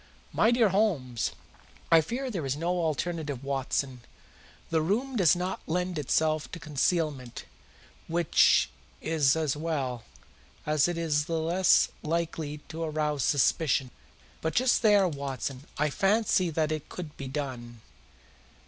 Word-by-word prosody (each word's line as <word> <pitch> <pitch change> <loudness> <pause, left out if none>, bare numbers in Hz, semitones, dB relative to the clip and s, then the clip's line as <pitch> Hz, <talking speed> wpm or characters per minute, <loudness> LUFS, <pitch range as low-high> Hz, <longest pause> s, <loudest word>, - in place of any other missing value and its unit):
"My 220 - +4
dear 235 -3 +4
Holmes!" 170 - 0 0.6
"I 165 -1 +7
fear 250 - -4
there 180 -8 -3
is 135 0 -1
no 165 +3 -2
alternative, 155 -4 -2
Watson. 135 -1 -2 0.7
The 160 -1 +2
room 235 +11 -1
does 185 -6 +5
not 180 +1 -3
lend 180 0 -1
itself 155 +2 0
to 170 - -5
concealment, 150 -3 -1 0.6
which 165 - +3 0.3
is 155 -4 +2
as 155 -4 0
well, 140 -7 -3 0.6
as 150 0 +3
it 175 -1 -2
is 150 -3 0
the 165 0 -1
less 175 +3 +3
likely 155 -2 -3
to 165 +1 -6
arouse 150 -3 -1
suspicion. 140 -2 +2 0.5
But 160 - -2
just 255 0 +3
there, 205 -4 +5
Watson, 140 -3 -5
I 150 0 +1
fancy 195 0 +2
that 155 -1 0
it 155 -2 -4
could 165 -5 -7
be 135 - -7
done." 125 -4 -5
155 Hz, 135 wpm, -28 LUFS, 140-175 Hz, 0.7 s, I